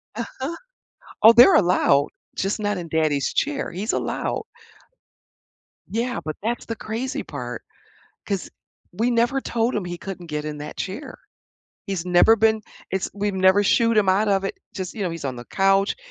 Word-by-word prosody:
Uh-huh. 260 +7 -5 0.7
Oh, 225 +2 +10
they're 245 +10 +8
allowed, 175 - +4 0.3
just 195 +3 -1
not 205 -2 -1
in 170 -2 -6
daddy's 155 -3 +1
chair, 280 -1 -1
he's 195 +6 -3
allowed. - - -2 1.5
Yeah, 235 +2 -2
but 155 - -4
that's 235 +2 -2
the 230 - -4
crazy 235 +5 -4
part, 125 -4 -6 0.6
'cause 195 -2 -3 0.4
we 225 +7 +1
never 240 +3 +2
told 235 -2 -1
him 205 -4 -2
he 175 0 -5
couldn't 180 -2 -8
get 150 -1 -4
in 150 -1 -5
that 150 0 -8
chair. 250 +9 -5 0.7
He's 190 -4 -3
never 180 +5 +5
been 220 0 +3 0.3
it's 190 0 -1
we've 205 0 -1
never 190 +2 +4
shooed 230 +3 +3
him 205 -3 +3
out 200 +3 +3
of 195 -1 +2
it. 195 - -4 0.2
Just, 185 -2 -4
you 215 - -4
know, 180 - -1
he's 165 -3 -7
on 130 -2 -3
the 120 - -8
couch, 195 +1 +2
195 Hz, 170 wpm, -23 LUFS, 175-230 Hz, 1.5 s, Oh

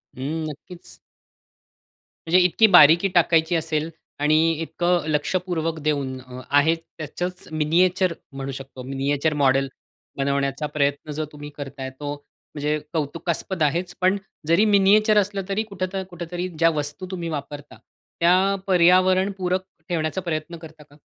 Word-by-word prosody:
हं, 150 +5 -3
नक्कीच. 170 +4 -12 1.3
म्हणजे 175 +3 +5
इतकी 220 +5 +5
बारीकी 170 +2 +8
टाकायची 165 0 +3
असेल 160 -1 -1 0.3
आणि 150 +1 +3 0.2
इतकं 175 +2 0
लक्षपूर्वक 165 +1 -1
देऊन 140 -3 -1
अ, 125 0 -10
आहे 145 +3 +4
त्याचंच 165 +2 -6
मिनिएचर 175 +4 +2 0.2
म्हणू 135 0 -5
शकतो. 135 -1 -9
मिनिएचर 140 +3 -1
मॉडेल 135 0 +3 0.5
बनवण्याचा 140 +1 -1
प्रयत्न 145 0 -1
जर 155 +2 -3
तुम्ही 145 0 -9
करत 140 -1 -8
आहे. 130 0 -4
तो 145 +2 -6 0.4
म्हणजे 150 +1 0 0.2
कौतुकास्पद 165 +3 -2
आहेच, 175 +4 0
पण 185 +2 +3 0.3
जरी 170 +6 +4
मिनिएचर 210 +1 +4
असलं 200 -1 +1
तरी 205 +3 0
कुठं 195 -4 -4
ना 190 - -2
कुठेतरी 175 0 -5
ज्या 165 +1 +4
वस्तू 150 +5 -3
तुम्ही 170 -3 -4
वापरता, 145 -1 -7 0.4
त्या 185 +3 +4
पर्यावरण 185 +1 +4
पूरक 185 0 0 0.3
ठेवण्याचा 165 +1 -1
प्रयत्न 170 -1 -4
करता 160 -1 -13
का? 145 - -22
160 Hz, 135 wpm, -23 LUFS, 145-180 Hz, 1.3 s, बारीकी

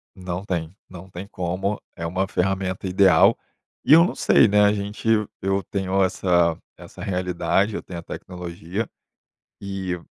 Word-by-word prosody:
Não 90 0 -5
tem, 85 -3 -3
não 95 +1 -11
tem 95 +2 -8
como, 95 +2 -3
é 85 - -5
uma 95 +3 -1
ferramenta 95 0 -1
ideal, 90 -2 +5 0.5
e - - +6
eu 165 +2 +9
não 180 - -1
sei, - - +5
né, 105 0 +4
a 105 - +4
gente 105 +2 -5 0.3
eu 95 +1 0
tenho 95 +1 0
essa 85 -3 +2 0.2
essa - - -12
realidade, 90 +2 0
eu - - -3
tenho 85 -2 -7
a - - -7
tecnologia 90 +4 -6 0.7
e 95 -2 -4
95 Hz, 155 wpm, -23 LUFS, 90-100 Hz, 0.7 s, eu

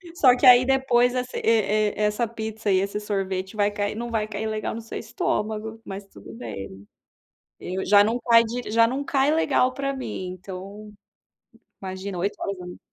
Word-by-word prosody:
Só 255 -5 +6
que 270 - +1
aí 250 0 +8
depois 255 -2 +3
e 250 - +1 0.2
e 215 -1 +2
essa 210 +2 +1
pizza 220 -2 -4
e 185 - +4
esse 200 +2 -2
sorvete 195 -1 -3
vai 205 0 +2
cair 205 0 -2
não 235 +1 -5
vai 215 -1 -1
cair 215 +1 -4
legal 215 0 -3
no 230 - -6
seu 225 - -7
estômago, 220 - -3
mas 195 +1 -7
tudo - - -13
bem, 100 - -8 0.7
eu 185 +2 -4
já 205 +1 +6
não 230 +3 0
cai 230 -1 +5
de 240 0 -5
já 230 +1 +5
não 265 +4 -2
cai 280 +1 +2
legal 270 -5 +2
pra 275 0 -2
mim 190 -8 -5
então, 200 +3 -9 0.9
imagina 190 0 -5
8:00 200 +4 -1
horas 200 -1 -2
da 180 - -8
manhã. 180 - -9
215 Hz, 185 wpm, -24 LUFS, 200-240 Hz, 0.9 s, aí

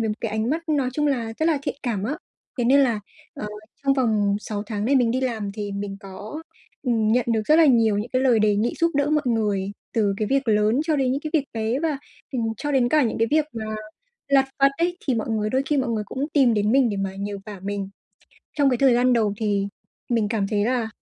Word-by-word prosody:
với 225 - 0
một 210 - -1
cái 225 - -2
ánh 220 +3 -1
mắt 330 +2 -3
nói 285 -4 +1
chung 295 +2 0
là 235 -6 -1
rất 315 - +1
là 315 -4 +2
thiện - - -2
cảm 220 -6 -2
á, 280 +8 -2 0.4
thế 240 - +1
nên 275 +3 +5
là, 235 -6 +2 0.3
ờ, 210 - -5 0.4
trong 275 0 +3
vòng 215 -6 +2
6 205 -1 -4
tháng 210 -1 -3
này 275 +4 +3
mình 240 -3 +3
đi 255 - 0
làm 225 -6 -2
thì 205 0 -5
mình 200 0 -4
có, 205 +10 -8 0.4
ừm, 225 -4 +1
nhận 250 0 +3
được 220 -1 +1
rất 310 - +5
là 330 -1 +6
nhiều 225 -6 +4
những 215 +3 -4
cái 255 0 +2
lời 245 -4 +4
đề 210 -1 +3
nghị 225 +4 0
giúp 335 0 +3
đỡ 285 +1 +1
mọi 305 -1 +2
người 205 -4 0 0.2
từ 205 -3 +1
cái 215 +1 -1
việc 275 -2 +1
lớn 215 +4 +3
cho 315 -2 +1
đến 260 -2 +1
những 275 - -1
cái 310 - -5
việc 300 -4 +2
bé 225 +2 -1
và, 310 -3 -1 0.3
ừm, 250 -3 -1
cho 290 -1 -3
đến 255 -3 +3
cả 305 +3 +4
những 230 -3 -1
cái 225 - +2
việc 305 0 +3
mà 225 -2 -5 0.6
lặt 270 -1 +4
vặt 275 0 +6
ấy, 350 +1 0
thì 260 - +3
mọi 225 0 -2
người 215 -1 0
đôi 260 +1 +1
khi 295 - +1
mọi 260 -3 0
người 220 -2 -1
cũng 275 +7 -3
tìm 260 -6 +4
đến 210 +2 +1
mình 265 -2 +4
để 205 - -3
mà 195 -1 -3
nhờ 200 +1 -4
vả 205 -3 -8
mình. 200 0 -3 0.7
Trong 285 -2 +4
cái 250 - +1
thời 265 -1 +4
gian 250 +1 +3
đầu 215 -4 +2
thì 205 -2 0 0.4
mình 230 -3 +1
cảm 210 -4 0
thấy 205 -1 0
là, 240 -2 0
235 Hz, 260 wpm, -23 LUFS, 210-275 Hz, 0.7 s, là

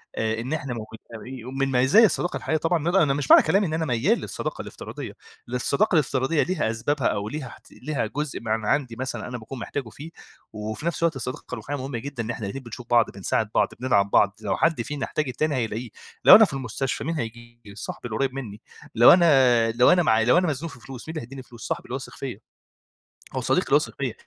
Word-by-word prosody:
آآ، 110 0 -1
إن 130 +6 -4
إحنا 140 -5 -3
موجودين 115 +2 -9
ومن 135 +1 -2
مزايا 130 - +6
الصداقة 175 -2 0
الحقيقية 160 - -1
طبعًا 165 +1 +1
إن 160 - -4
أنا 180 -1 +4
أنا 140 -2 +2
مش 140 -2 -1
معنى - - +9
كلامي 195 -1 +2
إن 155 - -4
أنا 160 0 0
ميّال 120 -4 +1
للصداقة - - -5
الافتراضية، - - -8 0.3
للصداقة 140 - +1
الافتراضية 140 +1 +2
ليها 175 -11 -1
أسبابها 130 +4 -1
أو 105 +1 -2
ليها 140 -4 -6 0.2
ليها 135 -4 -3
جزء 145 +5 -4
من 110 -1 -2
عندي 125 -1 0
مثلًا 130 +2 -4
أنا 125 - -5
باكون 120 +3 -9
محتاجه 130 -1 -5
فيه، 150 +8 -10 0.4
وفي 110 +7 -5
نفس 170 0 -1
الوقت 165 -3 +2
الصداقة 125 0 -5
الرّوحيّة 145 - -4
مُهمة 135 -2 -4
جدًا 135 -2 -5
إن 110 - -7
إحنا 110 -3 -5
الاتنين 130 +7 -6
بنشوف 120 0 -9
بعض 120 -1 +4
بنساعد 105 +2 -1
بعض، - - +4
بندعم 100 -6 +2
بعض، 100 0 +4
لو 100 -3 -1
حدّ 165 -7 +2
فينا 145 +2 -4
يحتاج 150 -3 -2
التاني 145 +3 -1
هيلاقيه، 115 0 -3 0.4
لو - - +12
أنا 220 0 +8
في 155 - -8
المستشفى 135 0 -3
مين 165 +2 -2
هييجي؟ 120 -4 -8
صاحبي 110 - -6
القريب 130 +4 -1
منّي 110 -6 -7 0.3
لو 120 +2 +9
أنا 130 -9 +4
لو 125 +2 +5
أنا 180 -1 +4
معايا 110 -7 +3
لو 125 +9 +5
أنا 180 - +3
مزنوق 155 +1 -3
في 125 - -13
فلوس، 125 +3 -10
مين 160 - -5
اللي - - -3
هيديني 130 +1 -10
فلوس؟ 120 -3 -10
صاحبي 170 +2 -3
اللي - - -8
هو - - 0
واثق - - -8
فيَّ. - - -6 1.0
هو - - -1
صديقي - - +1
اللي - - -3
واثق - - +1
فيَّ - - -2
130 Hz, 225 wpm, -24 LUFS, 115-150 Hz, 1.0 s, لو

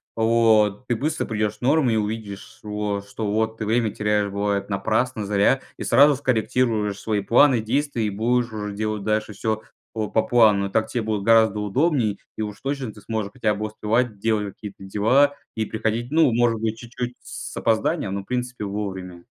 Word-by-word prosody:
вот, 110 -1 +3
ты 120 - +1
быстро 150 +7 -1
придешь 105 -1 -2
норму 135 +1 +3
и 115 - +2
увидишь, 105 -2 -5
вот, 105 -1 -3
шо 100 - -20
что 110 0 -4
вот 110 +1 0
ты 110 - -4
время 110 0 +1
теряешь, 105 0 0
бывает, 100 0 -1
напрасно, 110 +3 0
зря, 100 +6 +3 0.2
и - - -5
сразу 140 +4 +5
скорректируешь 115 -5 0
свои 105 -2 -1
планы, 125 +5 +4
действия. 125 +1 -1
И - - 0
будешь 120 +3 0
уже 105 -1 -4
делать 105 0 -3
дальше 110 0 -1
всё 110 +2 -2 0.3
по 110 -2 -2
по 110 - +2
плану. 105 -5 +4
Так 110 +2 +1
тебе 120 - -2
будет 105 -2 -2
гораздо 110 -1 +4
удобней, 115 - 0 0.2
и - - -3
уж 105 0 -5
точно 135 -5 -3
ты 105 - -14
сможешь 110 -1 -3
хотя 110 -4 0
бы 105 +1 -3
успевать 110 +1 -1
делать 105 -2 0
какие-то 100 -2 -10
дела 125 +9 +3 0.2
и 110 - 0
приходить, 110 +2 -2
ну, 160 -4 +4
может 115 -1 +2
быть, 110 0 -1
чуть-чуть 120 +1 -6
с - - -8
с - - -9
опозданием, 110 -3 0
но 100 - -2
в - - -17
принципе 125 -1 -3
вовремя. 95 -3 -5
110 Hz, 190 wpm, -23 LUFS, 105-120 Hz, 0.3 s, сразу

